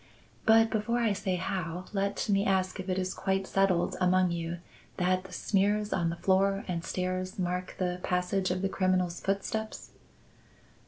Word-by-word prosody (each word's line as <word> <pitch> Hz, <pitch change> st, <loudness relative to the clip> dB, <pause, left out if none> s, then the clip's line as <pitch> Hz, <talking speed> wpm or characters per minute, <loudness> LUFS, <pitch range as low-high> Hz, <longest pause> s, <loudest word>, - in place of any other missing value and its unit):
But 225 Hz, 0 st, +6 dB
before 220 Hz, +2 st, 0 dB
I 230 Hz, -3 st, +2 dB
say 190 Hz, -1 st, -1 dB
how, 180 Hz, -1 st, -3 dB
let 200 Hz, 0 st, -1 dB
me 200 Hz, -1 st, +3 dB
ask 190 Hz, -1 st, +1 dB
if 185 Hz, +1 st, -5 dB
it 185 Hz, -, 0 dB
is 185 Hz, 0 st, -1 dB
quite 195 Hz, 0 st, -1 dB
settled 190 Hz, -3 st, +2 dB
among 185 Hz, 0 st, +3 dB
you 170 Hz, 0 st, -3 dB, 0.4 s
that 185 Hz, 0 st, +1 dB
the 190 Hz, -, -11 dB
smears 205 Hz, +3 st, +1 dB
on 170 Hz, -2 st, +1 dB
the 170 Hz, -, -3 dB
floor 195 Hz, +2 st, +2 dB
and 170 Hz, -3 st, -2 dB
stairs 185 Hz, +3 st, -3 dB
mark 180 Hz, 0 st, -2 dB
the 180 Hz, -1 st, -1 dB
passage 185 Hz, +1 st, 0 dB
of 185 Hz, +1 st, -1 dB
the -, -, +3 dB
criminal's 185 Hz, -2 st, 0 dB
footsteps!" 210 Hz, +3 st, -3 dB
185 Hz, 165 wpm, -30 LUFS, 180-195 Hz, 0.4 s, But